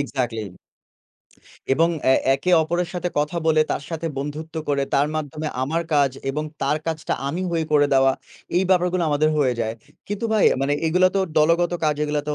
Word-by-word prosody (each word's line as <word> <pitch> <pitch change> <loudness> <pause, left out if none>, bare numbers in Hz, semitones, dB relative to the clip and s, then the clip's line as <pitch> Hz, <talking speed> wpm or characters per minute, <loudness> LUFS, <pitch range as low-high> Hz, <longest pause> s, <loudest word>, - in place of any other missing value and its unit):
Exactly. 125 -5 -2 1.3
এবং 165 +5 +3 0.2
এ - - +5 0.2
একে 140 +7 -2
অপরের 175 +2 -1
সাথে 180 0 -2
কথা 150 +4 -1
বলে 155 -1 +4
তার - - -1
সাথে 165 0 -3
বন্ধুত্ব 150 +3 -6
করে 140 -1 +1
তার 140 +1 +3
মাধ্যমে 155 0 -4
আমার 165 +5 -1
কাজ 140 -2 +4 0.2
এবং 150 +3 -3 0.2
তার 140 +2 +1
কাজটা 160 -1 -2
আমি 175 +6 -3
হয়ে 165 -2 -1
করে 145 -1 +5
দেওয়া 135 0 +4 0.4
এই 185 - +4
ব্যাপারগুলো 180 0 +2
আমাদের 150 +1 +2
হয়ে 130 -4 +2
যায়। 110 0 -2 0.3
কিন্তু 205 +2 -3
ভাই, 215 - +3 0.2
মানে 140 - +1
এগুলো 180 +3 +4
তো 195 - +3 0.2
দলগত 170 +3 +3
কাজ, 150 - +2
এগুলা 150 0 -1
তো 150 - 0
155 Hz, 180 wpm, -22 LUFS, 140-170 Hz, 1.3 s, এ